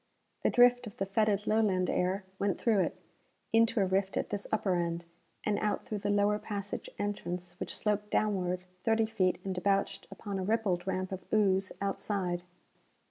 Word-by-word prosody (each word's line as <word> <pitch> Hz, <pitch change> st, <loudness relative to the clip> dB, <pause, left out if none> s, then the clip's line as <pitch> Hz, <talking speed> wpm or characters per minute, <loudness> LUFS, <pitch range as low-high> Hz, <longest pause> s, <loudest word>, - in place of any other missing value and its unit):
A -, -, +4 dB
drift 245 Hz, 0 st, +5 dB
of 215 Hz, +3 st, -10 dB
the 195 Hz, -, 0 dB
fetid, 205 Hz, +1 st, +1 dB
Lowland 205 Hz, -5 st, +2 dB
air 185 Hz, +3 st, 0 dB, 0.2 s
went 200 Hz, -1 st, +1 dB
through 220 Hz, -4 st, +3 dB
it -, -, 0 dB, 0.5 s
into 230 Hz, +1 st, +4 dB
a -, -, +4 dB
rift 190 Hz, +1 st, 0 dB
at -, -, -1 dB
this 200 Hz, -1 st, -2 dB
upper 210 Hz, -3 st, +1 dB
end, 170 Hz, -1 st, -1 dB, 0.4 s
and 210 Hz, -1 st, +1 dB
out 210 Hz, -1 st, -1 dB
through 210 Hz, -, -3 dB
the 205 Hz, -, -2 dB
lower 205 Hz, +1 st, +3 dB
passage 205 Hz, -1 st, -5 dB
entrance 180 Hz, -3 st, -3 dB
which -, -, -3 dB
sloped 210 Hz, -1 st, 0 dB
downward 185 Hz, -4 st, 0 dB, 0.2 s
thirty 225 Hz, 0 st, +3 dB
feet 200 Hz, -5 st, +1 dB
and 190 Hz, -, -1 dB
debouched 195 Hz, +2 st, 0 dB
upon 200 Hz, -3 st, -5 dB
a -, -, -2 dB
rippled 195 Hz, -4 st, 0 dB
ramp 185 Hz, 0 st, -1 dB
of 190 Hz, -1 st, -5 dB
ooze 195 Hz, -3 st, +3 dB
outside. 195 Hz, -3 st, -1 dB
200 Hz, 175 wpm, -31 LUFS, 185-215 Hz, 0.5 s, drift